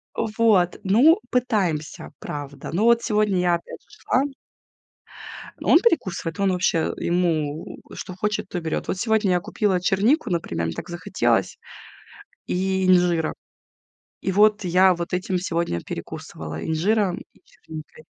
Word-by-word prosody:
Вот, 215 -5 +2
ну, 250 - +5
пытаемся, 200 -12 -1
правда. 145 -1 -7
Ну, 190 +6 +1
вот 235 0 +5
сегодня 210 -2 +1
я 175 -1 +2
опять 170 - -9
же - - -33
шла. 260 - 0 1.4
Он - - +6
перекусывает, 185 - 0
он 195 -1 +2
вообще, 180 -3 +1
ему, 165 -4 -1
что 185 - -7
хочет, 210 +2 -2
то - - -4
и - - -10
берёт. 160 -1 -3
Вот - - -2
сегодня 220 -1 +1
я 180 - +3
купила 190 +1 0
чернику, 220 - +2
например, 85 - -2
мне 80 - -4
так - - -7
захотелось, 120 - 0 0.9
и 190 +1 0
инжира. 175 -3 +3 0.9
И 190 - -1
вот 210 +2 +4
я 185 +1 +4
вот 170 0 -5
этим 185 +1 -1
сегодня 170 - -2
перекусывала 80 0 -7
инжиром 185 +4 +1 0.2
и - - -25
черникой. 155 -1 -12
180 Hz, 140 wpm, -23 LUFS, 165-210 Hz, 1.4 s, Он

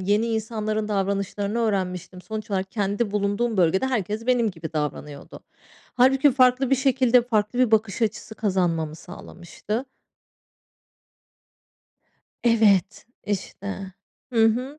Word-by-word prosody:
Yeni 205 +4 +1
insanların 215 -1 -2
davranışlarını 200 +1 -1
öğrenmiştim. 185 -4 -2
Sonuç 220 -1 -6
olarak 190 -1 -2
kendi 205 0 -1
bulunduğum 210 +2 -1
bölgede 185 +7 +2
herkes 220 -2 -2
benim 240 -3 +2
gibi 165 -3 -8
davranıyordu. 150 -1 -5 0.5
Hâlbuki 265 +3 +4
farklı 255 0 +3
bir 270 - +4
şekilde 255 -2 +3
farklı 225 0 -1
bir 250 -3 +3
bakış 220 0 +1
açısı 220 0 -2
kazanmamı 175 -7 -1
sağlamıştı. 180 - -7 2.6
Evet, 210 -4 +3 0.2
işte. 200 -1 -4 0.7
Hı 225 -2 +4
hı. 255 +7 0
215 Hz, 110 wpm, -24 LUFS, 195-235 Hz, 2.6 s, Hâlbuki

